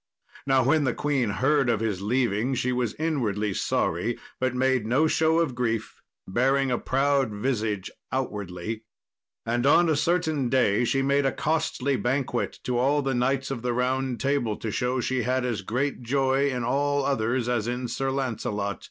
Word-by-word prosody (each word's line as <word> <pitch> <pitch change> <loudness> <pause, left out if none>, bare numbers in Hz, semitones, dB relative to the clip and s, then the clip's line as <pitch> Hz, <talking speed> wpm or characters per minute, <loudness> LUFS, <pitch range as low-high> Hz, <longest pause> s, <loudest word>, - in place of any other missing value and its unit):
Now 135 -1 +4
when 150 +4 +3
the 125 - 0
queen 140 -6 0
heard 135 +5 +2
of 115 -3 +2
his 105 -4 -2
leaving 120 +2 0
she 125 +1 0
was 125 -3 -1
inwardly 110 -11 -1
sorry, - - -1 0.2
but 130 -1 0
made 130 -3 +1
no 130 +7 +3
show 160 0 +2
of 165 -6 0
grief, 115 -3 -2 0.3
bearing 135 +6 +2
a 120 - +1
proud 135 -1 +1
visage 105 -3 -2 0.2
outwardly. 105 -4 -3 0.6
And 120 +3 0
on 170 +3 +5
a 155 - +3
certain 160 -4 +1
day 120 -3 +3
she 135 +3 +1
made 140 0 +2
a - - +1
costly 150 -4 0
banquet 125 -1 -1
to 125 -1 -1
all 140 +3 +2
the 135 0 0
knights 135 +2 0
of 125 -4 -4
the 125 0 -1
Round 130 +1 -1
Table, 135 -6 0
to 110 - -4
show 125 +4 0
she 130 +1 0
had 125 +1 0
as 115 -5 -2
great 125 +8 -2
joy 135 +2 +1
in 125 -3 -2
all 140 +3 +1
others 120 -2 0
as 120 -3 0
in 125 +1 -2
Sir 135 +3 -2
Lancelot. 105 -6 -2
130 Hz, 175 wpm, -26 LUFS, 115-135 Hz, 0.6 s, on